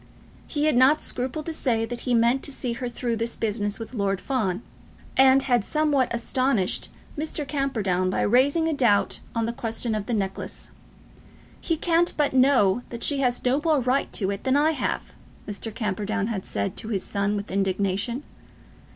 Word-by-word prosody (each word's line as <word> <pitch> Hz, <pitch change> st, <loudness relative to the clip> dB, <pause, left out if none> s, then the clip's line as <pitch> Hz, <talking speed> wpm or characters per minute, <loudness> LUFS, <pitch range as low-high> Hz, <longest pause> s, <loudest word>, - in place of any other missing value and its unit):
He 295 Hz, -1 st, -1 dB
had 310 Hz, -, +3 dB
not 265 Hz, +5 st, +5 dB
scrupled 265 Hz, +4 st, -3 dB
to 330 Hz, -, -3 dB
say 230 Hz, -7 st, 0 dB
that 240 Hz, +1 st, -6 dB
he 245 Hz, -, +4 dB
meant 235 Hz, +3 st, +3 dB
to -, -, -6 dB
see 250 Hz, -3 st, -3 dB
her 240 Hz, +1 st, -4 dB
through 235 Hz, -1 st, -2 dB
this 230 Hz, +1 st, -2 dB
business 205 Hz, -2 st, -1 dB
with 225 Hz, +2 st, -8 dB
Lord 200 Hz, -4 st, 0 dB
Fawn, 215 Hz, -5 st, -1 dB, 0.5 s
and 265 Hz, 0 st, +6 dB
had 245 Hz, -5 st, +2 dB
somewhat 295 Hz, -1 st, +1 dB
astonished 235 Hz, -3 st, 0 dB, 0.3 s
Mr. 300 Hz, -1 st, -3 dB
Camperdown 215 Hz, -11 st, 0 dB
by -, -, 0 dB
raising 280 Hz, +8 st, +3 dB
a 320 Hz, -, +1 dB
doubt 235 Hz, -8 st, +2 dB, 0.2 s
on 230 Hz, -1 st, +1 dB
the 230 Hz, -, -2 dB
question 225 Hz, 0 st, -2 dB
of 210 Hz, -2 st, -3 dB
the 240 Hz, -, 0 dB
necklace. 195 Hz, -2 st, -4 dB, 0.9 s
"He 330 Hz, -, -1 dB
can't 340 Hz, +1 st, +2 dB
but 295 Hz, -3 st, +1 dB
know 255 Hz, -6 st, +4 dB
that 235 Hz, -1 st, -6 dB
she 285 Hz, -2 st, +3 dB
has 250 Hz, -2 st, 0 dB
no 260 Hz, +4 st, +2 dB
more 315 Hz, -3 st, +3 dB
right 255 Hz, +2 st, 0 dB
to 195 Hz, -2 st, 0 dB
it 200 Hz, -, -5 dB
than 260 Hz, +1 st, +2 dB
I 305 Hz, +2 st, +4 dB
have," 315 Hz, -, -3 dB, 0.3 s
Mr. 210 Hz, +2 st, -5 dB
Camperdown 210 Hz, -1 st, -2 dB
had 210 Hz, -4 st, -4 dB
said 100 Hz, -1 st, -2 dB
to -, -, -4 dB
his 205 Hz, -4 st, -1 dB
son 200 Hz, 0 st, 0 dB
with 205 Hz, 0 st, -5 dB
indignation. 200 Hz, +6 st, -1 dB
240 Hz, 185 wpm, -25 LUFS, 205-275 Hz, 0.9 s, and